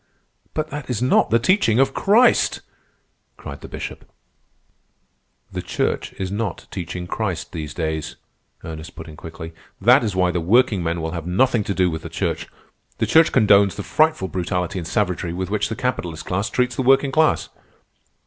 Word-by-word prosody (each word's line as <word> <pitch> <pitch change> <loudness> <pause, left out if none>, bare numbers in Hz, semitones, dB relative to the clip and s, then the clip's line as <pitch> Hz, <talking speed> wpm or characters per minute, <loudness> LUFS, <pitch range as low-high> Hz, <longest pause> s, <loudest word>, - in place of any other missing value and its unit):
"But 155 0 -2
that 145 -2 -6
is 120 -4 -1
not 125 +1 +3
the 115 - +4
teaching 120 - +2
of 135 0 +3
Christ!" 230 +5 +3 0.8
cried - - -9
the - - -8
Bishop. - - -7 1.5
"The - - -4
Church - - -2
is 95 -1 -4
not 100 -2 -3
teaching 90 -1 -5
Christ 95 -3 -3
these 75 -3 -6
days," 80 -2 -3 0.5
Ernest 80 +2 -8
put 80 - -9
in 80 - -10
quickly. 80 +1 -9 0.3
"That 125 +6 +5
is 105 -4 -2
why 90 -1 +2
the 90 - -1
workingmen 90 -4 +2
will 80 0 -3
have 85 0 -5
nothing 115 +5 +2
to 100 - -2
do 90 -2 +2
with 80 0 -4
the - - -8
Church. - - -2 0.5
The - - +1
Church 160 0 +5
condones 100 -5 +5
the 100 - -5
frightful 155 - +2
brutality 90 0 -2
and 85 - -6
savagery 90 -5 -1
with 95 +2 -4
which 105 -1 0
the 110 - -3
capitalist 90 -11 -3
class 100 +5 -1
treats 125 -1 0
the - - -1
working 135 +1 +4
class." 155 +2 +2
100 Hz, 175 wpm, -21 LUFS, 85-125 Hz, 1.5 s, That